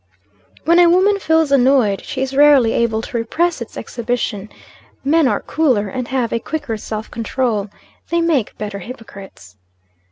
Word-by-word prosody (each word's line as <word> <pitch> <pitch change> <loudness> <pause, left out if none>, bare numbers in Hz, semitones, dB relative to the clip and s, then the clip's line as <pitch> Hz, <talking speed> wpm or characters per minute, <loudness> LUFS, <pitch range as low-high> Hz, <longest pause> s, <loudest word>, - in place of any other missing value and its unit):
When 340 +3 +5
a 350 -1 +6
woman 390 +3 +3
feels 320 -4 +2
annoyed, 255 -6 +3
she 265 - -3
is 265 0 -4
rarely 280 -5 +5
able 225 -1 0
to 240 - -4
repress 320 +7 -1
its 235 - -8
exhibition. 230 -3 -3 0.5
Men 305 +1 +3
are - - 0
cooler, 255 -10 0
and 250 +4 -4
have 255 -3 -1
a 230 - 0
quicker 290 -2 -4
self 215 0 -6
control. 225 -2 -2 0.4
They 340 - +1
make 320 -9 0
better 205 -1 -5
hypocrites. 195 - -12
250 Hz, 155 wpm, -18 LUFS, 220-295 Hz, 0.5 s, a